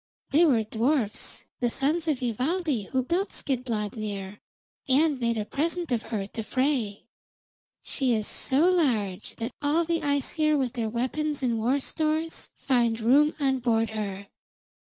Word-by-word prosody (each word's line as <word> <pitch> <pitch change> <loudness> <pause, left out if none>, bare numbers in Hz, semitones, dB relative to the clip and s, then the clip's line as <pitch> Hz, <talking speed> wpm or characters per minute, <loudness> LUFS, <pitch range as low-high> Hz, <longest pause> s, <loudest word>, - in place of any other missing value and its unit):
They 315 +5 +6
were 245 -8 +3
dwarfs, 225 +1 -1
the 245 - +1
sons 305 +7 0
of 280 -5 0
Ivaldi, 255 - -1
who 260 -1 +1
built 355 +9 0
Skidbladnir, 210 -6 -3 0.5
and 290 +1 +3
made 235 -1 0
a 210 - -1
present 330 +5 -2
of 235 -2 +1
her 210 -4 -2
to 225 +3 -6
Frey. 250 -4 0 0.8
She 255 -4 +1
is 215 -1 -1
so 280 +10 +1
large 215 - 0
that 230 +2 -4
all 300 +4 +2
the 335 0 0
Æsir 300 +2 +1
with 255 -3 -1
their 230 -3 -2
weapons 270 +5 -1
and 235 -3 +1
war 250 +6 +2
stores 315 +3 -1
find 235 -4 +1
room 280 +7 +4
on 265 -2 +1
board 225 -2 +1
her. 200 -2 -4
255 Hz, 150 wpm, -27 LUFS, 225-300 Hz, 0.8 s, They